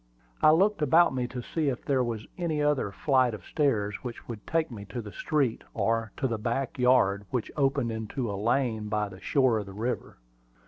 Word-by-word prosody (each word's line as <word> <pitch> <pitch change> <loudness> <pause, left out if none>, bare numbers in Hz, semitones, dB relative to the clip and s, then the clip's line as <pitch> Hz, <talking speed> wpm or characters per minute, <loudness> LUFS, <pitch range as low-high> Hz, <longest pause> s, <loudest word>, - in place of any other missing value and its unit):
I - - +7
looked 190 +4 +4
about 160 +3 +5
me 125 -1 -1
to 125 0 -6
see 155 +1 -1
if 125 - -4
there 135 -3 +2
was 115 -3 -3
any 165 -4 -1
other 145 -7 +1
flight 130 0 +2
of 95 - -12
stairs 105 -10 0
which 120 -2 -8
would 110 -3 -8
take 165 -3 0
me 105 -4 -7
to 100 +5 -6
the 105 -3 -7
street, 140 -4 0
or 115 -1 0
to 135 - 0
the 115 -3 -2
back 120 +4 -2
yard, 105 -6 +3
which 125 -3 -2
opened 135 -4 +1
into 110 +3 -3
a 100 - -3
lane 110 +1 0
by 105 -1 0
the 95 -1 -11
shore 130 -6 +2
of 105 - -6
the 95 - -9
river. 115 +5 -3
125 Hz, 210 wpm, -28 LUFS, 110-140 Hz, -, I